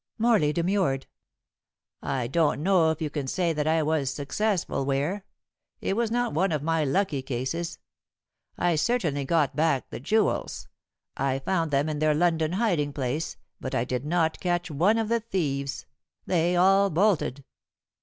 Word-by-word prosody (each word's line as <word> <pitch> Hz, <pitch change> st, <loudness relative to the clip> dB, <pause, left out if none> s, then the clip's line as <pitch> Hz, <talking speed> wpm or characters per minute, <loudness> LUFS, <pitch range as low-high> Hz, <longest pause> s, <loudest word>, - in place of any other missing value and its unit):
Morley 220 Hz, -10 st, +3 dB
demurred. 170 Hz, -5 st, 0 dB, 1.0 s
"I 130 Hz, -3 st, -2 dB
don't 150 Hz, +2 st, +1 dB
know 180 Hz, -3 st, +4 dB
if 160 Hz, 0 st, -2 dB
you 150 Hz, -, -3 dB
can 140 Hz, -3 st, -3 dB
say 170 Hz, +3 st, 0 dB
that 150 Hz, 0 st, -1 dB
I 160 Hz, 0 st, +2 dB
was 150 Hz, -3 st, 0 dB
successful, 170 Hz, +3 st, -1 dB
Ware. 145 Hz, +9 st, -1 dB, 0.5 s
It 195 Hz, -, -1 dB
was 230 Hz, 0 st, 0 dB
not 240 Hz, -5 st, 0 dB
one 180 Hz, +4 st, +1 dB
of 150 Hz, -3 st, -1 dB
my 165 Hz, 0 st, +1 dB
lucky 150 Hz, -1 st, 0 dB
cases. 130 Hz, +7 st, -3 dB, 0.8 s
I 170 Hz, -2 st, +1 dB
certainly 155 Hz, -, 0 dB
got 155 Hz, -2 st, +1 dB
back 155 Hz, -4 st, +1 dB
the -, -, -5 dB
jewels. 210 Hz, -, 0 dB, 0.5 s
I 135 Hz, 0 st, 0 dB
found 165 Hz, +3 st, -1 dB
them 140 Hz, +1 st, +1 dB
in 155 Hz, -1 st, -2 dB
their 155 Hz, 0 st, +2 dB
London 165 Hz, 0 st, +1 dB
hiding 175 Hz, -9 st, 0 dB
place, 140 Hz, +4 st, -3 dB, 0.2 s
but 130 Hz, -, -4 dB
I 115 Hz, -, +1 dB
did 125 Hz, 0 st, -3 dB
not 160 Hz, +1 st, 0 dB
catch 175 Hz, -1 st, -1 dB
one 180 Hz, +10 st, +3 dB
of 225 Hz, -1 st, 0 dB
the 235 Hz, +1 st, +1 dB
thieves. 145 Hz, -11 st, -3 dB, 0.4 s
They 175 Hz, 0 st, +1 dB
all 195 Hz, +2 st, +4 dB
bolted." 165 Hz, -6 st, +1 dB
160 Hz, 160 wpm, -26 LUFS, 140-185 Hz, 1.0 s, know